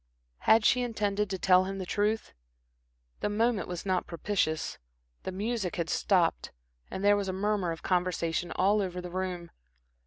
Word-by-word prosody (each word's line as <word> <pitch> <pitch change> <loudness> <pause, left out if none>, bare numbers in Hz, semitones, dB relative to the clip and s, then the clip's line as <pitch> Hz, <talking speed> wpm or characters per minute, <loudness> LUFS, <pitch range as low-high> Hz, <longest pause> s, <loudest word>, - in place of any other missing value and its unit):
Had 220 0 +6
she 250 - +4
intended 210 -4 -1
to 190 - -2
tell 185 0 +4
him 195 +1 -4
the 190 - -4
truth? 210 +4 -1 0.9
The - - -1
moment 220 -1 +1
was 180 0 -5
not 185 -2 0
propitious. 170 -2 -1 0.4
The - - -4
music 205 0 -2
had 170 -2 -2
stopped, 180 -4 +1 0.4
and 195 - -4
there 205 0 +6
was 200 -1 -2
a - - -2
murmur 195 -2 0
of 165 - -7
conversation 175 -2 0
all 205 +3 +3
over 180 -2 -3
the 180 -1 -7
room. 180 -2 -4
190 Hz, 165 wpm, -29 LUFS, 180-205 Hz, 0.9 s, Had